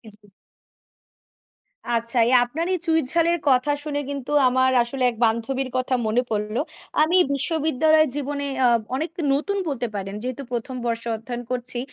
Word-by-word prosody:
জি। 210 0 -24 1.7
আচ্ছা 230 +1 0
এই 250 - +2
আপনার 305 +8 -3
এই - - +1
চুঁই 320 0 +3
ঝালের 340 0 +2
কথা 255 +2 +3
শুনে 290 -1 -2
কিন্তু 280 -1 -5 0.2
আমার 260 +1 +3
আসলে 255 +2 -4
এক - - -12
বান্ধবীর 235 +4 -1
কথা 255 0 0
মনে 225 +3 +2
পড়ল। 210 0 -2 0.5
আমি 335 +4 +3 0.2
বিশ্ববিদ্যালয়ের 310 +1 +2
জীবনে 285 0 -3 0.2
আ - - +6 0.3
অনেক 315 +5 -2 0.2
নতুন 400 +9 -1
বলতে 250 -4 -2
পারেন 195 0 -4
যেহেতু 255 +2 -4
প্রথম 245 +2 -4
বর্ষ 230 -1 -2
অধ্যয়ন 240 +2 -6
করছি। 245 -1 -1
260 Hz, 150 wpm, -23 LUFS, 235-295 Hz, 1.7 s, আ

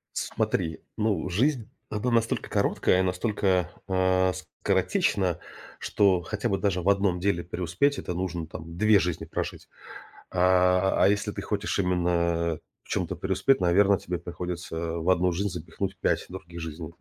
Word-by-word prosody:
Смотри, 80 -1 -1 0.2
ну 105 -3 0
жизнь, 120 - +1 0.2
она 110 +3 -1
настолько 115 -1 +1
короткая, 90 - +2
настолько, 95 -1 0 0.2
а, 95 0 +2 0.3
скоротечна, 90 -5 +1 0.4
что 95 -3 +2
хотя 105 +5 -3
бы 95 - +1
даже 90 -3 0
в 95 - +1
1 100 -3 +2
деле 85 -2 0
преуспеть 90 - 0
это 90 - -4
нужно 85 -2 -3
там 80 +1 -9
2 110 -1 +5
жизни 85 -2 -2
прожить. - - -5 0.6
А, 90 +1 +3
а - - +6
если 105 0 0
ты - - -5
хочешь 105 -1 -2
именно 85 -3 +1 0.3
в - - -23
чем-то - - -2
преуспеть, 135 0 +2
наверно, 95 +2 +4
тебе 90 0 -4
приходится 85 0 -5 0.2
в 85 +3 -3
1 90 0 +3
жизнь 100 +3 -1
запихнуть 90 +3 -5
5 - - 0
других 85 -2 -9
жизней. 80 0 -7
90 Hz, 150 wpm, -27 LUFS, 85-100 Hz, 0.6 s, а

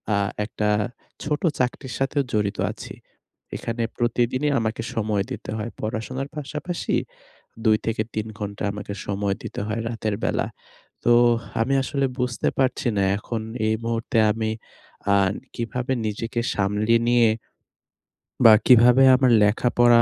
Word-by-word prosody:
আ - - +2 0.3
একটা 105 -1 -2 0.5
ছোট 150 0 -1 0.2
চাকরির 125 0 -2
সাথেও 135 +1 +1
জড়িত 105 -1 0
আছি। - - -9 0.6
এখানে 115 0 -3
প্রতিদিনই 120 +4 +1
আমাকে 110 0 -2
সময় 105 -3 0
দিতে - - -7
হয়। 110 +2 -4
পড়াশোনার 125 +5 -4
পাশাপাশি 150 +5 -3 0.7
২ 110 -1 +5
থেকে 110 -1 0
৩ 110 0 -2
ঘন্টা 100 -1 -5
আমাকে 100 0 -6
সময় 100 -1 -1
দিতে - - -6
হয়, 110 +2 -2
রাতের 110 -2 -2
বেলা। - - 0 0.6
তো, 120 - +5 0.5
আমি 130 +5 +2
আসলে 135 +1 0
বুঝতে 125 -1 0
পারছি 130 -1 +1
না। 100 - +2 0.2
এখন 115 +1 -4 0.3
এই 110 - +2
মুহূর্তে 115 0 -1
আমি 110 0 -2 0.6
আ - - +5 0.4
কিভাবে 125 +2 -3
নিজেকে 115 +3 -3
সামলিয়ে 105 +3 +2
নিয়ে 120 -1 +5 1.2
বা 115 - +11
কিভাবে 125 +2 +7
আমার 130 -2 +3
লেখাপড়া 120 +2 +4
115 Hz, 130 wpm, -23 LUFS, 110-125 Hz, 1.2 s, বা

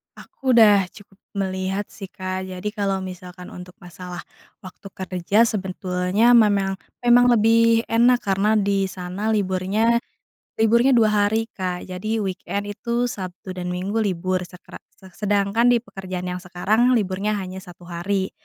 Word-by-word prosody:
Aku 260 -3 -2
udah 205 -5 +6
cukup 200 -1 -17 0.2
melihat 190 +1 -2
sih, 195 - -9
Kak. 185 -1 -5
Jadi 185 +3 -5
kalau 195 -3 -2
misalkan 180 0 -9
untuk 180 0 -11
masalah, 180 0 -9 0.4
waktu 185 +1 -11
kerja 190 +4 +1
sebetulnya, 190 +1 0
memang 200 -4 +3 0.2
memang 245 +1 +6
lebih 230 +1 +4
enak, 240 +2 +3
karena 200 +2 +1
di 200 -2 +1
sana 185 +3 -5
liburnya 205 +4 +1 0.6
liburnya 235 +4 +4
2 220 -2 +4 0.2
hari 225 +1 -1
Kak. 180 -2 -4
Jadi 190 +5 -3
weekend 195 +1 -3
itu, 235 +4 -2
Sabtu 185 -3 -7
dan 180 -1 -5
Minggu 190 +5 -2
libur, 185 -2 -1
sekra 180 +2 -13 0.2
se 190 -1 -16
sedangkan 205 +4 +1
di 240 -1 +4
pekerjaan 185 -3 -6
yang 180 0 -4
sekarang, 210 +7 +1
liburnya 200 +1 -1
hanya 190 -1 -6
1 180 -2 -14
hari. 190 +3 -2
195 Hz, 145 wpm, -22 LUFS, 185-220 Hz, 0.6 s, udah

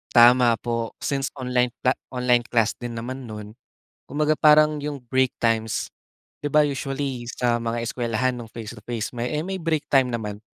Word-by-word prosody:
Tama 120 0 +7
po, 115 -1 -2
since 135 -2 0
online 125 -1 +1 0.2
cla 125 - +4 0.2
online 125 -1 +3
class 115 -3 +2
din 120 -1 -5
naman 125 +2 -6
noon, 105 -1 -8 0.5
kumbaga 150 +2 0
parang 150 0 +5
yung 145 -2 -4
break 130 0 +2
times, 115 -1 0 0.6
di 145 - -2
ba, 150 +1 +6
usually 135 -2 -3
sa 120 -1 +1
mga 115 0 -2
eskuwelahan 125 +1 -1
noong 115 -2 -9
face 115 0 -7
to 105 - -14
face 120 0 -4
may 120 +3 -2
eh, - - -2
may 190 - -2
break 160 -2 -1
time 130 -3 +3
naman 105 -2 -4
125 Hz, 175 wpm, -24 LUFS, 115-135 Hz, 0.6 s, Tama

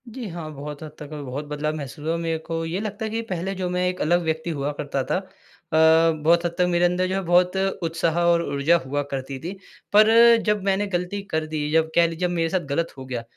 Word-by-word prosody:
जी, 235 0 -7
हाँ, 165 -2 -6
बहुत 145 +1 -7
हद 155 - -8
तक 150 0 -9
अभी 150 -1 -6
बहुत 140 +3 -5
बदलाव 150 +1 -2
महसूस 145 0 -7
हुआ, 165 +1 0
मेरे 165 -1 -1
को 165 +1 -4
ये 165 +4 -2
लगता 215 +1 -4
है - - -3
कि 225 +1 -1
पहले 190 -3 -3
जो 185 -1 -2
मैं 180 0 0
एक 180 0 -3
अलग 175 +3 +3
व्यक्ति 160 +1 -2
हुआ 145 -2 -2
करता 140 -2 -2
था। - - -1
अ, 160 -3 +2
बहुत 170 +2 +4
हद 170 0 -2
तक 180 - +3
मेरे 175 0 +3
अंदर 180 +1 +1
जो 185 - -2
है 195 - 0
बहुत 180 +2 +3 0.3
उत्साह 165 0 0
और 170 -1 +3
ऊर्जा 145 +5 +3
हुआ 145 +2 -1
करती 135 0 -4
थी, 170 +7 -5 0.4
पर 230 +2 +7
जब 210 -2 +1
मैंने 195 +1 +1
गलती 180 +3 -2
कर 160 0 0
दी, 150 -1 -2
जब 160 0 +2
कह 170 0 +5
लीजिए 165 +2 -2
जब 175 - -3
मेरे 165 -1 +1
साथ 185 - +1
गलत 170 +3 -1
हो 130 - -8
गया, 125 -3 -4
165 Hz, 245 wpm, -23 LUFS, 155-180 Hz, 0.4 s, पर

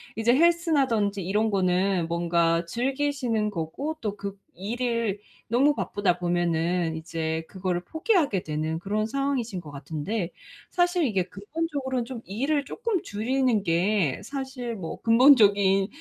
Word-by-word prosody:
이제 230 +2 +3
헬스라든지 275 - +2
이런 210 +4 +1
거는 185 -2 +1
뭔가 170 0 +1
즐기시는 250 0 -1
거고 200 - -4
또 210 -2 -2
그 200 0 -6 0.2
일을 230 +1 -2 0.3
너무 270 +6 +3
바쁘다 195 -8 0
보면은 175 -1 0
이제 160 0 -3
그거를 180 -2 -2
포기하게 320 - +1
되는 155 +1 -2
그런 210 +3 -1
상황이신 245 -6 -2
것 150 - -11
같은데, 160 - -4 0.4
사실 350 -2 +2
이게 195 -7 +1
근본적으로는 265 - -3
좀 245 -2 -7
일을 280 +8 -1
조금 445 -2 -2
줄이는 235 +1 0
게 175 -3 +1
사실 265 -4 -5
뭐 180 -6 -6
근본적인 205 -6 +5
210 Hz, 290 characters per minute, -26 LUFS, 175-265 Hz, 0.4 s, 근본적인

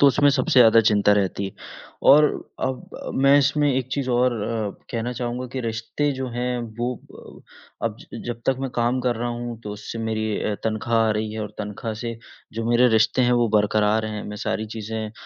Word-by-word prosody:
तो 140 - +7
उसमें 145 +2 +5
सबसे 130 -1 +2
ज़्यादा 115 -1 +7
चिंता 105 -1 +4
रहती 100 -1 0
है। 95 - -7 0.6
और 150 +2 +8 0.4
अब 130 -1 -4
मैं 140 +1 +7
इसमें 145 +1 +2
एक 130 -1 -1
चीज़ 135 -1 -2
और 125 +1 +3
अ, 110 -1 -2 0.2
कहना 120 +1 -2
चाहूँगा 125 +1 -4
कि 130 - -3
रिश्ते 115 +5 -2
जो 130 -1 -4
हैं 125 0 -1 0.2
वो 120 +1 0 1.0
अब - - -1 0.3
जब 120 -1 -4
तक 135 - +3
मैं 135 -1 -3
काम 120 +2 +1
कर 125 -2 0
रहा 120 +1 -2
हूँ 120 -1 -5
तो 105 - -5
उससे 105 +2 -7
मेरी 110 -1 -2 0.2
अ, 105 - -1
तनख्वाह 110 +1 0
आ - - +3
रही 105 0 -2
है 110 - -4
और 105 - -4
तनख्वाह 105 +2 -4
से 115 -1 -4 0.4
जो 115 +1 -4
मेरे 120 +1 +5
रिश्ते 110 +3 +3
हैं 125 0 +3
वो 115 - +2
बरकरार 105 +1 +2
हैं 105 -1 -5
मैं 105 - -6
सारी 110 +1 -2
चीज़ें 110 0 -4
115 Hz, 200 wpm, -23 LUFS, 110-125 Hz, 1.0 s, और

